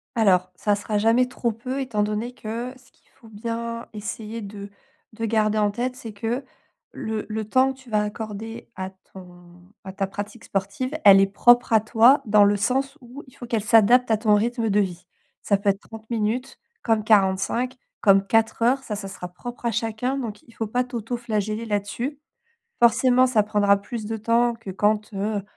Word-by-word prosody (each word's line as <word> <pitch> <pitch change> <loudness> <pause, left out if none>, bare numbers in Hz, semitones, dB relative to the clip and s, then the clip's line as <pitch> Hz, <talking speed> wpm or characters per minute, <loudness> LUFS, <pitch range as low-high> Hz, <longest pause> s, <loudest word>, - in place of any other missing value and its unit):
Alors, 185 -5 +3
ça 205 +3 +1
sera 210 +1 -2
jamais 225 +4 +3
trop 245 -1 -2
peu 250 +5 -5
étant 235 -6 -1
donné 215 +4 -3
que 235 +2 -5
ce 255 -1 -23
qu'il - - -34
faut 230 - -16
bien 230 +2 -5
essayer 215 +1 -6
de 200 0 -8 0.4
de 225 +1 -7
garder 215 -1 +1
en 210 -1 +2
tête, 250 +4 -3
c'est 230 -3 -8
que 230 +6 -3 0.5
le 220 -4 -4
le 215 0 -3
temps 260 +5 +3
que - - -20
tu 260 -2 -16
vas 210 -1 +2
accorder 220 +1 -6
à 190 0 -4 0.2
ton 175 -1 -14 0.2
à 190 -1 -8
ta 195 0 -1
pratique 205 +4 -7
sportive, 200 +7 -3
elle 195 -1 +9
est 195 - +4
propre 240 +5 +4
à 220 - +7
toi 230 +5 +5
dans 210 -1 +5
le 205 0 +3
sens 270 +7 -1
où 250 +4 -11
il 260 - -18
faut - - -9
qu'elle 230 -3 -1
s'adapte 230 +3 +5
à 220 - +4
ton 215 -1 +3
rythme 230 +1 0
de 205 +1 +3
vie. 180 -3 -2 0.4
Ça 200 - +2
peut 200 +1 0
être 195 0 +1
30 220 -1 -11
minutes 235 +3 -2 0.3
comme 225 -2 +1
45, 210 +4 +2 0.3
comme 195 -2 +5
4 225 +3 +1
heures, 265 +3 +2
ça 215 - -4
ça 200 -1 -6
sera 190 -2 -7
propre 240 +7 -9
à 235 - +2
chacun, 230 +4 -2
donc 220 -6 -5
il - - -19
faut 225 - -3
pas 245 +4 0
t'autoflageller 230 -3 -3
là-dessus. 225 +7 -3 0.6
Forcément, 255 +2 +5
ça 235 -4 +3
prendra 205 -1 +3
plus 210 +2 -6
de 225 +1 -3
temps 235 +2 +2
que 230 -4 -9
quand, 210 +3 0
heu, 205 +1 -2
220 Hz, 195 wpm, -24 LUFS, 205-240 Hz, 0.6 s, elle